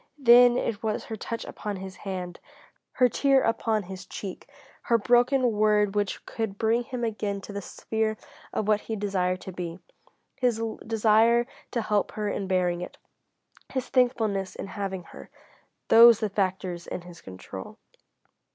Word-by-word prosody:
Then 245 -2 +7
it 220 -4 -2
was 220 -2 -2
her 220 - -6
touch 230 +2 -5
upon 210 -2 -5
his 190 0 -8
hand, 180 -3 -6 0.5
her 250 - +4
tear 270 +2 +3
upon 225 -2 0
his 190 +1 -9
cheek, 195 -3 -7 0.4
her 235 - +5
broken 245 +2 +3
word 210 -1 +2
which 205 -1 -2
could 220 -3 -4
bring 230 +3 +1
him 245 0 -5
again 210 -3 -2
into 200 +1 -8
the 200 - -4
sphere 220 +2 -2 0.3
of 210 - -2
what 210 -1 +3
he 225 - -4
desired 185 -3 -1
to 190 - -7
be. 175 -2 -5 0.6
His 245 -4 +1 0.3
desire 225 +2 +4 0.2
to 235 -3 -2
help 210 -1 0
her 210 -1 -3
in 200 -1 -3
bearing 180 -2 +1
it, 180 - -8 0.7
his 260 -2 -3
thankfulness 220 -7 +1
in - - -6
having 195 -2 -5
her, - - -13 0.6
those 230 -1 +8
the 215 - -1
factors 185 -3 -2
in - - -5
his 175 -1 -13
control. 95 0 -9
210 Hz, 160 wpm, -26 LUFS, 190-230 Hz, 0.7 s, those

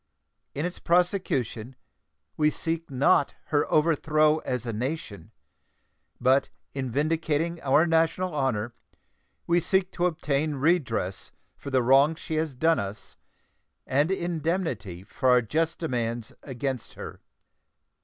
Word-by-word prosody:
In 145 +4 -1
its 180 - -5
prosecution 150 - 0 0.6
we 150 -1 +3
seek 165 +1 -3
not 135 +1 +2
her 145 -1 +1
overthrow 155 0 +3
as 125 -4 -3
a 115 - -3
nation, 120 -3 -4 0.9
but 130 +2 +3 0.2
in 135 -2 -3
vindicating 160 +4 -1
our 145 +4 +4
national 165 +2 +1
honor 120 -5 -1 0.7
we 170 +1 +3
seek 190 +1 +1
to 175 0 +1
obtain 150 -2 -1
redress 135 - 0 0.2
for - - -8
the 130 -2 +2
wrongs 140 +5 +4
she 160 - -6
has 155 -4 -1
done 160 +5 +2
us 100 +1 -7 0.7
and 145 +5 +1
indemnity 165 - -2
for 130 +5 -1
our 125 0 +6
just 160 +9 -1
demands 120 -7 -3
against 130 -2 -4
her. - - -9
145 Hz, 125 wpm, -26 LUFS, 125-165 Hz, 0.9 s, our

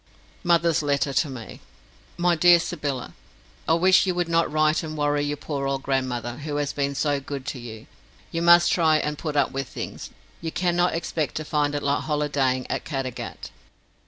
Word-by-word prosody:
Mother's 170 -2 +3
Letter 140 -1 0
to 145 +3 +1
Me 125 -4 -9 0.6
MY 175 0 +3
DEAR 175 +2 +7
SYBYLLA, 145 - -4 0.5
I 160 - +4
wish 185 +3 +4
you 180 - 0
would 175 -1 0
not 165 -1 +1
write 155 +1 +2
and 155 -2 -6
worry 145 0 +1
your 145 0 -2
poor 140 -2 -3
old 135 0 -2
grandmother, 125 -3 -2
who 145 0 -5
has 145 0 -1
been 140 -1 -1
so 145 0 +1
good 135 -1 -6
to 145 -2 -5
you. 110 -2 -9 0.5
You 165 - -2
must 170 0 +6
try 160 -3 +4
and 150 -1 -2
put 150 0 -5
up 140 -2 +2
with 135 -1 -3
things; - - -7 0.3
you 165 -1 -4
cannot 175 0 +1
expect 160 -3 -2
to 155 - -3
find 150 -1 0
it 145 - -2
like 140 0 0
holidaying 145 -4 0
at - - -3
Caddagat. 135 -4 -5
145 Hz, 190 wpm, -24 LUFS, 140-165 Hz, 0.6 s, DEAR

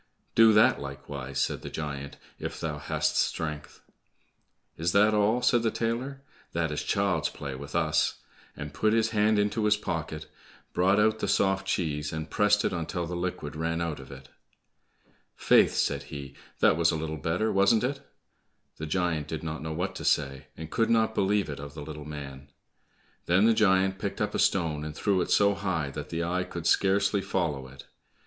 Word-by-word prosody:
"Do 115 -1 +7
that 105 -7 +5
likewise," 70 -1 -6
said - - 0
the - - -7
giant, 70 -2 -5 0.2
"if - - -5
thou 75 -2 -3
hast - - -1
strength?" 75 -2 -2 0.9
"Is 85 +2 -1
that 105 +2 +5
all?" 105 +4 +2
said 120 -1 +4
the 115 - +1
tailor, 125 +5 -3 0.3
"that 80 -2 0
is 75 - -2
child's - - 0
play 70 -2 -6
with 70 +2 -8
us!" - - +2 0.4
and 75 -1 -6
put 110 +8 +2
his 115 0 +2
hand 105 0 +3
into 105 +2 +1
his 105 0 +4
pocket, 80 -5 -4 0.5
brought 95 +3 +3
out 110 +1 +3
the - - -1
soft 95 -1 +1
cheese, 75 -5 -1
and 80 0 -5
pressed 105 0 +3
it - - 0
until 85 0 -3
the 90 +1 -5
liquid 85 -4 -4
ran 80 +1 -1
out 85 -4 -3
of 65 0 -11
it. 65 -1 -12 1.1
"Faith," - - +4
said - - 0
he, 70 -1 -7 0.3
"that - - +5
was 85 -1 +3
a - - +1
little 80 0 -4
better, 90 +8 0
wasn't 100 +4 +4
it?" 140 +2 -2 0.8
The 80 - -5
giant 80 -3 -1
did 80 +1 -5
not 80 0 -4
know 80 0 -4
what 90 +5 -2
to - - -7
say, 70 -2 0
and 80 0 -8
could 115 - +1
not 110 -1 +3
believe 100 0 +1
it 70 -2 -6
of 70 +1 -9
the 75 - -6
little 75 0 -8
man. 70 -2 -8 0.8
Then 95 +4 +4
the 115 - +5
giant 95 -3 +3
picked - - -4
up - - -1
a - - -1
stone 80 -5 +1
and 75 0 -6
threw 100 -3 +1
it - - -2
so 100 0 +4
high 85 -8 -2
that - - -7
the 85 +1 -2
eye 90 +2 0
could 85 -2 -7
scarcely 100 +2 +3
follow 75 -9 -2
it. 65 0 -13
85 Hz, 190 wpm, -28 LUFS, 75-105 Hz, 1.1 s, Do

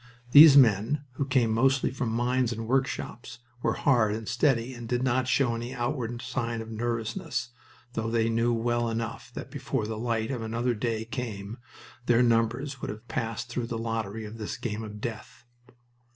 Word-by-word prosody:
These 145 0 +10
men, 125 +4 +4
who 135 +3 -2
came 125 -5 +2
mostly 130 +3 +2
from 130 -2 -2
mines 120 +2 +1
and 115 -1 -4
workshops, 130 -2 -2 0.2
were - - +1
hard 110 -7 +3
and 110 -1 -6
steady 125 -1 +1
and 120 -2 -8
did 125 0 0
not 130 0 +1
show 130 -2 +2
any 120 +2 -5
outward 120 -1 -3
sign 115 -3 -2
of 110 0 -7
nervousness, 115 +1 -3 0.4
though 110 -1 -2
they 115 -1 +2
knew 115 +1 +2
well 120 0 0
enough 115 0 -4
that - - -7
before 135 -4 -2
the 110 0 -4
light 115 0 -1
of 125 -4 -3
another 115 +2 -1
day 110 0 -2
came 115 -3 -5 0.5
their 120 +1 +5
numbers 120 +4 +1
would - - -4
have 110 +3 -8
passed 115 +2 -3
through 120 -1 -3
the 115 -1 -3
lottery 110 -1 -3
of 110 +2 -9
this 105 - -4
game 110 -2 -4
of 105 -1 -8
death. 115 +1 -7
115 Hz, 180 wpm, -28 LUFS, 110-125 Hz, 0.5 s, These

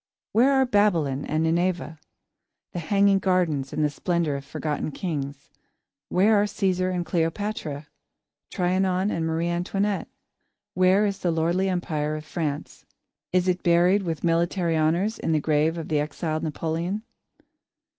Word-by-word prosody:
Where 245 +5 +4
are 265 -1 +4
Babylon 170 - +2
and 155 +1 0
Nineveh; 170 -1 0 0.7
the 175 - -3
hanging 195 +3 +3
gardens 175 -8 0
and 155 - -1
the 150 - +3
splendour 170 0 -1
of 140 0 -4
forgotten 150 +2 -3
kings? 140 -4 -5 0.6
Where 205 +3 +4
are - - +2
Cæsar 185 -2 0
and 175 -1 -2
Cleopatra; 165 -3 -2 0.6
Trianon 185 +1 +1
and 165 -1 -1
Marie 165 +1 -1
Antoinette? 195 +4 -1 0.7
Where 185 +3 +4
is 200 -1 -2
the 175 - 0
lordly 170 +4 +1
Empire 155 -4 -1
of 155 0 -7
France? 150 -3 -4 0.5
Is 185 0 +2
it 180 0 +1
buried 175 +4 +4
with 165 -4 -4
military 170 0 +1
honours, 170 +8 +1
in 160 - 0
the 155 - +3
grave 155 +2 +1
of 165 - -5
the 155 -2 +1
exiled 155 +1 -2
Napoleon? 165 +5 -2
170 Hz, 145 wpm, -25 LUFS, 155-190 Hz, 0.7 s, Where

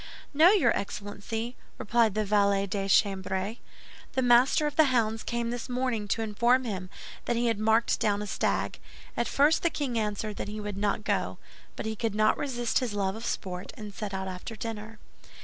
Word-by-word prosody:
"No, 315 +5 +7
your 335 - +4
Excellency," 215 +4 -4 0.2
replied 225 -1 +2
the 215 0 +1
valet 200 -1 +3
de 195 0 -3
chambre, 195 +2 +1 0.6
"the 260 - +1
Master 245 +5 +5
of 295 - -2
the 315 - +6
Hounds 225 -4 +1
came 235 0 -2
this 245 +1 -5
morning 250 -4 -1
to 225 +3 0
inform 235 +4 +2
him 190 -6 -4 0.4
that 240 - 0
he 235 +1 +1
had 230 -3 +1
marked 220 +2 +2
down 205 -1 +1
a - - -4
stag. 205 - -1 0.4
At 235 - 0
first 295 +3 +3
the 340 - +2
king 265 -7 -2
answered 210 0 -3
that - - -4
he 210 +1 -5
would 210 -1 -4
not 205 +1 -1
go; - - -1 0.4
but - - -5
he 220 0 -2
could 220 -1 -2
not 215 0 +4
resist 240 -4 0
his 245 -5 -3
love 195 -1 0
of 225 +1 -5
sport, 180 -1 -4
and 210 -2 -8
set 200 +2 -5
out 190 0 -3
after 185 +4 -6
dinner." 220 0 -6
220 Hz, 195 wpm, -28 LUFS, 205-240 Hz, 0.6 s, No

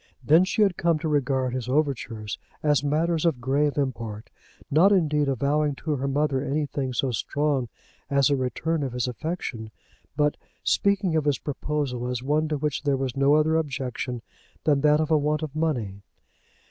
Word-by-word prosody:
Then 160 +8 +5
she 215 +3 +2
had 195 -4 +1
come 170 -2 +2
to 160 +1 -3
regard 130 -4 0
his 125 -1 -3
overtures 125 -7 -1 0.2
as 145 -3 +3
matters 160 +3 +1
of 165 -7 +1
grave 140 +4 +1
import, 115 -6 -3 0.4
not 170 +8 +5
indeed 150 -6 +2
avowing 140 +3 +1
to 155 - -4
her 135 0 -2
mother 140 -1 +1
anything 140 -2 -2
so 130 +1 0
strong 140 +1 -1 0.4
as 140 0 +3
a - - +4
return 150 +5 -1
of 135 -3 -3
his 125 0 -1
affection, 125 -4 -4 0.5
but 150 0 +2 0.3
speaking 200 -4 +2
of 155 -2 +1
his 145 -3 +2
proposal 140 -4 -3
as 125 0 -3
one 150 +3 +1
to 150 -1 -1
which 150 +1 -2
there 140 -2 +1
was 130 -2 -3
no 140 +2 +4
other 155 +1 +3
objection 130 -5 -3 0.4
than 145 -3 +3
that 150 0 +4
of 155 0 -1
a 155 - +5
want 150 +2 0
of 155 -1 -5
money. 120 -12 -1
145 Hz, 175 wpm, -25 LUFS, 130-155 Hz, 0.5 s, Then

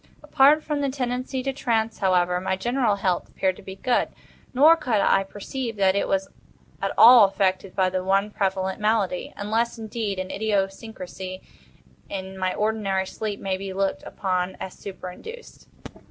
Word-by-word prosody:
Apart 300 +1 +4
from 295 -2 -2
the 280 - 0
tendency 255 0 -3
to 270 0 -2
trance, 225 -4 -1
however, 180 -2 +2
my 190 - 0
general 240 +2 +1
health 185 -3 -1
appeared 190 -1 0
to - - -12
be 190 -1 -9
good; 245 +5 +1 0.4
nor 300 +6 +7
could 250 -10 0
I 195 - +3
perceive 225 +5 -5
that 195 -2 +3
it 200 - 0
was 195 0 0 0.5
at - - -1
all 235 -2 +9
affected 195 -1 -1
by 185 -1 +2
the 185 0 -2
one 195 +2 +1
prevalent 190 -2 -1
malady—unless, 215 +2 0
indeed, 220 -2 -4
an 185 0 -4
idiosyncrasy 195 -2 -3 0.7
in 190 -1 -6
my 185 -1 -1
ordinary 210 -3 0
sleep 210 +1 -5
may 190 -1 -2
be 195 0 -6
looked 195 0 -1
upon 185 -1 -2
as 190 - -6
superinduced. 200 - -10
200 Hz, 155 wpm, -24 LUFS, 190-230 Hz, 0.7 s, all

